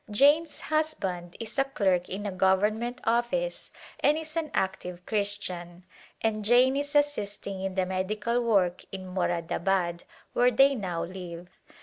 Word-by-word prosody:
Jane's 290 +9 +3
husband 195 - -2
is 230 +4 -4
a - - +6
clerk 190 -10 0
in 200 +3 -4
a 205 - -1
government 210 +6 +1
office 240 - 0 0.3
and 300 +1 +3
is 315 0 -6
an 325 -2 -1
active 180 -2 -2
Christian, 185 -4 -3 0.4
and 215 -1 0
Jane 250 +4 +5
is 285 +1 -2
assisting 205 -9 0
in 190 -1 -3
the 190 -1 +2
medical 210 +6 -1
work 190 -6 +2
in 190 -1 -6
Moradabad 175 0 0 0.3
where 245 +1 +5
they 270 +3 +5
now 185 -9 -3
live. 180 -1 -7
205 Hz, 140 wpm, -28 LUFS, 185-250 Hz, 0.4 s, a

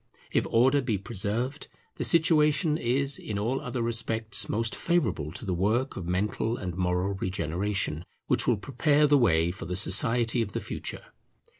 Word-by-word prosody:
If - - +1
order 130 +5 +4
be 115 -5 -1
preserved, 115 +7 -3 0.3
the - - -2
situation 155 -2 +3
is 140 +2 +1
in 105 - -5
all 120 +6 -1
other 125 -1 -3
respects 110 -3 0
most 115 +1 0
favourable 145 - 0
to 95 - -5
the 95 - -1
work 110 +9 0
of 90 -3 -6
mental 105 +5 -1
and 90 -3 -5
moral 90 +1 0
regeneration 90 -2 -2 0.2
which - - +1
will 120 - +3
prepare 145 +7 +2
the 145 -1 +4
way 85 -8 +3
for 90 - -8
the 90 - -3
society 115 +5 +1
of 105 -4 -4
the - - -1
future. - - -5
110 Hz, 165 wpm, -27 LUFS, 95-130 Hz, 0.3 s, order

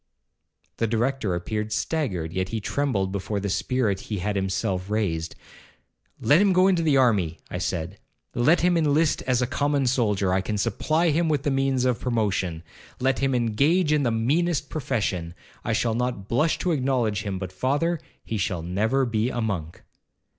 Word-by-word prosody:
The 115 - +1
Director 115 -3 0
appeared 105 +5 -3
staggered, 100 - -2
yet 95 +1 -1
he 115 - -2
trembled 105 -5 -1
before 100 +1 -2
the 100 -1 -2
spirit 110 -4 0
he 105 - -5
had 105 +3 -2
himself 95 0 -1
raised. 85 -7 -1 0.8
'Let 150 +6 +4
him 200 -2 +4
go 185 +1 +5
into 180 -3 +3
the 150 -4 +3
army,' 100 -11 +2
I - - -3
said; 85 +5 -3 0.3
'let 155 +9 +3
him 180 0 +3
inlist 155 -1 +2
as 125 -1 +2
a - - +2
common 140 +2 0
soldier, 105 -7 +1
I 95 - +2
can 105 +2 -3
supply 155 - +1
him 165 +2 +1
with 145 -3 0
the 145 - 0
means 135 -1 +1
of 125 -2 +1
promotion;—let 105 +2 -2
him 135 -1 +1
engage 145 - +2
in 150 - +3
the 125 - +1
meanest 145 +9 0
profession, 95 - -2 0.3
I 110 - -1
shall 115 +1 +1
not 120 -4 -2
blush 150 +9 +1
to 180 - +2
acknowledge 125 -7 0
him, 100 -3 -3
but, 95 -1 -5
father, 145 - 0 0.2
he 110 - -3
shall 90 -4 -1
never 110 +10 +1
be 115 0 0
a 120 - -3
monk.' 90 -8 -3
115 Hz, 175 wpm, -25 LUFS, 100-140 Hz, 0.8 s, go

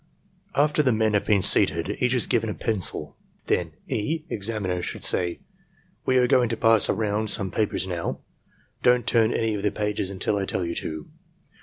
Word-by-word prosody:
PROCEDURE 145 - +5
After 150 0 +2
the 130 -4 +2
men 110 -1 +1
have 105 - 0
been 100 -3 +3
seated, - - +3
each - - +2
is - - +2
given - - 0
a - - -4
pencil. 90 -8 -3 0.3
Then - - 0
E. 155 +9 -2
(examiner) 100 -4 -1
should - - -5
say: 85 -1 +1 0.7
"We 130 - +3
are 125 - +5
going 125 -1 +3
to 115 - -2
pass 115 -2 +4
around 105 0 0
some 100 -4 -2
papers 105 -2 -1
now; 90 -3 -4 0.6
don't 125 -2 +3
turn 115 -1 +3
any 115 -2 0
of 105 - -3
the 105 - +1
pages 105 -2 -2
until 100 +1 -1
I 100 - -1
tell 90 - -1
you 85 - -3
to." 80 -2 -4
105 Hz, 190 wpm, -25 LUFS, 95-115 Hz, 0.7 s, PROCEDURE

